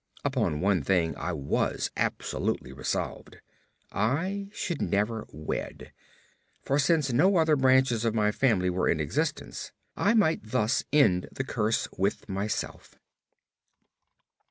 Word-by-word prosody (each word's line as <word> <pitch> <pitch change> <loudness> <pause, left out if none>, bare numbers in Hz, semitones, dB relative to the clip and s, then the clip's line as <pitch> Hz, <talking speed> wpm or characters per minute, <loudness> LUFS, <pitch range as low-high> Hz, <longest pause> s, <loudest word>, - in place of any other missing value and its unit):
Upon 75 +1 0
one 95 -2 +2
thing 80 0 +1
I 90 - -3
was 70 -4 -1
absolutely - - -2
resolved. 65 0 -4 0.5
I 185 - -1
should 175 -6 -3
never 105 +2 0
wed, 75 +2 -5 0.7
for 140 +2 +1
since 150 -3 +2
no 185 +10 +4
other 160 -2 +4
branches 130 -3 +3
of 115 -1 0
my 105 -1 +2
family 105 -7 +2
were 90 +1 0
in 80 - +1
existence, 75 -2 -2 0.2
I 205 +4 +2
might 165 -8 +3
thus 110 +2 0
end 115 -12 +3
the 135 - -3
curse 115 -4 0
with 100 +2 0
myself. 100 +2 -4
110 Hz, 125 wpm, -28 LUFS, 90-140 Hz, 0.7 s, no